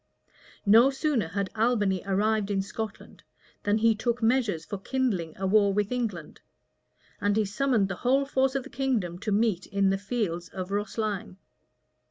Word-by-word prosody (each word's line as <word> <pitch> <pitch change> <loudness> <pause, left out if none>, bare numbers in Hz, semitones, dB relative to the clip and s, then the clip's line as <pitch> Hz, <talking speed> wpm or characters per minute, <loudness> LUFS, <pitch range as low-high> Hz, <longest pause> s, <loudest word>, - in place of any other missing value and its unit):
No 225 +6 +7
sooner 270 - 0
had 195 +3 -3
Albany 210 -5 +1
arrived 210 +1 +1
in 195 -1 0
Scotland, 215 +1 -7 0.4
than 205 +1 +1
he 225 +1 +4
took 235 +2 -1
measures 225 -9 +1
for 200 - -5
kindling 200 - -2
a 195 - -3
war 200 +1 +4
with 210 +1 0
England; 215 -11 -4 0.8
and 205 +1 +1
he 215 - +2
summoned 220 0 +1
the 195 -2 -5
whole 270 +3 +3
force 265 -1 +1
of 270 - 0
the - - -12
kingdom 230 -10 -1
to 215 +1 -3
meet 205 -3 +1
in 195 0 +2
the 195 - 0
fields 200 -5 -3
of 185 -1 -6
Rosline. 205 -2 -3
210 Hz, 165 wpm, -27 LUFS, 195-240 Hz, 0.8 s, No